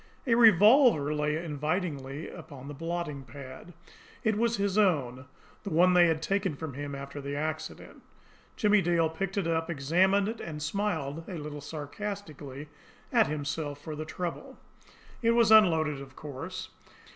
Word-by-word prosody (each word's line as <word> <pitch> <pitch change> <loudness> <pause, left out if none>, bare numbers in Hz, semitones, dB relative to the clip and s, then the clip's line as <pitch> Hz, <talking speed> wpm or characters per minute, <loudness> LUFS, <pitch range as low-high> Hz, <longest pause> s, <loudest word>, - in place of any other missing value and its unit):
A 240 - +2
revolver 220 - +6
lay 150 0 0
invitingly 150 -2 -3
upon 140 -2 -10
the 145 - -6
blotting 165 -2 -4
pad. 130 +6 -11 0.5
It 220 -3 +2
was 235 +2 +1
his 200 -1 0
own, 135 - +1 0.3
the 200 - -5
one 180 +2 +4
they 175 -1 +6
had 160 -1 0
taken 195 -5 0
from 155 -1 -6
him 145 +1 -5
after 140 +1 -7
the 140 +1 -4
accident. 155 +1 -5 0.5
Jimmie 210 -1 +4
Dale 170 -2 +2
picked 195 +4 -4
it 195 - +1
up, 165 0 0
examined 180 +7 +2
it 225 +1 -4
and 155 -2 -6
smiled 165 -5 -2
a 180 - -5
little 150 -1 -6
sarcastically 150 -2 -7 0.5
at 230 -3 +5
himself 145 0 -3
for 155 +1 -7
his 155 +1 -6
trouble. 170 +1 -5 0.6
It 230 0 +3
was 230 -2 +4
unloaded, 160 -9 +5
of 135 -1 -12
course. 165 +6 -7
160 Hz, 155 wpm, -29 LUFS, 145-195 Hz, 0.6 s, revolver